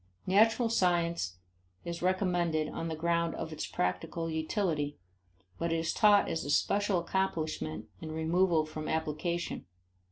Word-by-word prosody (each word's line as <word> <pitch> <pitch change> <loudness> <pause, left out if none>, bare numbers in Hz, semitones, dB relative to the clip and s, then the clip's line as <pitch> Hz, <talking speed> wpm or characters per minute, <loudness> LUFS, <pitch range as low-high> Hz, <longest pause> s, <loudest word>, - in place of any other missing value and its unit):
Natural 225 +5 +4
science 170 - +1 0.5
is 170 0 -4
recommended 175 -4 +1
on 165 - -4
the 160 - -3
ground 170 +1 0
of 160 -1 -5
its 155 - -4
practical 90 - -2
utility, 160 -2 -1 0.6
but 170 0 -1
is 165 0 0
taught 205 -1 +5
as 160 - -2
a - - -5
special 200 +6 +2
accomplishment 160 - -2 0.2
in 160 -1 -6
removal 160 +1 +2
from 155 0 -6
application. 160 - -2
165 Hz, 130 wpm, -31 LUFS, 155-180 Hz, 0.6 s, taught